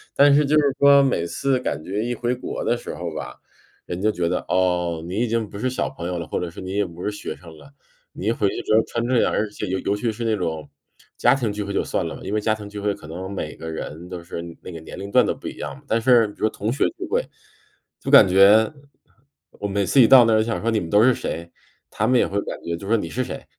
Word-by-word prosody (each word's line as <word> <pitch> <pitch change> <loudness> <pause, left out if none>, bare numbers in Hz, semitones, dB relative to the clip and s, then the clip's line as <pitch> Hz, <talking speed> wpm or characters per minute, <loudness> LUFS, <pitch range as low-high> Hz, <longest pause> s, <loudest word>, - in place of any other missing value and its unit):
但 140 0 +6
是 145 +1 +4
就 145 +2 +2
是 140 -2 +1
说 140 0 +7
每 125 -11 +1
次 135 +8 0
感 80 - -3
觉 100 +5 -3
一 120 - -1
回 120 +2 -1
国 125 - -5
的 120 - +1
时 120 - -7
候 85 -2 -5
吧， - - -7 0.5
人 90 - -5
就 110 +2 +2
觉 85 -4 -1
得， - - 0
哦， 90 -3 0
你 90 - -5
已 120 - +1
经 115 -2 -1
不 100 - -9
是 130 - 0
小 130 - -2
朋 130 -10 -7
友 90 0 -3
了， 85 - -6
或 - - -2
者 90 - -3
是 - - -10
你 95 0 -6
也 100 0 +1
不 85 0 -9
是 - - 0
学 105 - -6
生 85 -3 -14
了。 140 - -16 0.4
你 - - -7
一 - - +4
回 110 -3 +1
去 - - -4
之 110 - +2
后 110 - +6
穿 115 - -2
这 125 -2 +3
样， - - +1
而 110 - 0
且 105 - -6
尤 95 +1 -1
尤 100 - -1
其 115 +2 -1
是 115 +2 -6
那 110 -1 +2
种 80 -6 -4 0.5
家 - - +4
庭 120 -6 -1
聚 105 0 -3
会 100 0 -5
就 - - +1
算 - - -2
了， - - -7
因 - - -5
为 105 - +1
家 110 +1 +1
庭 105 -1 -9
聚 105 0 -7
会 100 0 0
可 75 - -12
能 90 +4 -6
每 100 - -5
个 80 - -7
人 80 +1 -7
都 90 -2 -7
是 85 0 -6 0.2
那 - - -9
个 85 - -8
年 - - -10
龄 100 +1 -7
段 - - +5
都 - - 0
不 - - -9
一 - - -6
样 - - -5
嘛。 140 - -19
但 115 - +1
是， 120 -2 +5
比 105 - -13
如 110 - +2
同 105 +2 -3
学 140 - +1
聚 365 - -5
会， 475 +4 +1 0.8
就 135 - -5
感 135 -8 +8
觉， 100 +4 +6 0.8
我 100 - -5
每 100 0 0
次 135 - +5
一 115 - +7
到 130 -1 +8
那 115 - +3
儿 110 - +4
想 115 +1 -2
说： 115 - 0
“你 110 - +1
们 85 - -6
都 105 +4 +5
是 130 +1 +5
谁？” 85 -6 -5 0.4
他 110 - -1
们 125 0 +4
也 - - +2
会 100 - -1
感 - - -6
觉 85 - -3
就 95 +4 -9
说： 115 +2 +3
“你 85 - -4
是 130 - -2
谁？” - - -7
105 Hz, 315 characters per minute, -22 LUFS, 90-120 Hz, 0.8 s, 感